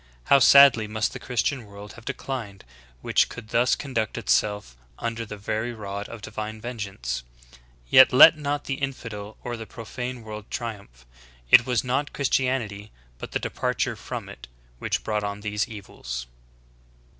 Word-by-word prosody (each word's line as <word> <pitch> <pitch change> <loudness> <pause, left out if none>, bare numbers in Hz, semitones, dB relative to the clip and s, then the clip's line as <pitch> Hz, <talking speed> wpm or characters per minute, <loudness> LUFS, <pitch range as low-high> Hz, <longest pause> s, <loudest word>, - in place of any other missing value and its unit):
How 140 - +7
sad 140 0 +8
ly 110 -1 -3
must 110 0 -1
the - - -6
Christian 125 0 -1
world 100 +1 -11
have - - -14
declined 125 - -5 0.4
which - - +3
could 110 - -10
thus 120 +2 +3
conduct 115 -7 -3
itself 105 - 0 0.2
under 115 -1 -4
the 105 - -7
very 110 +4 -3
rod 100 -1 -6
of 115 -3 -10
divine 110 0 -5
vengeance? 100 - -4 0.7
Yet 130 - +8
let 130 +5 +9
not 145 -1 -2
the 135 -1 -4
infidel 110 -6 -5
or 120 -1 -4
the 110 -1 -8
profane 125 +2 -6
world 110 -1 -8
triumph. 100 - -7 0.5
It 120 - +8
was 125 -2 +1
not 130 +3 -1
Christianity, 125 -7 -1 0.3
hut - - -7
the - - +2
departure - - -2
from - - -6
it, - - -11 0.3
which - - -2
brought 105 -1 -1
on 100 0 -4
these 105 0 -1
evils." 65 - -7
110 Hz, 155 wpm, -25 LUFS, 105-125 Hz, 0.7 s, let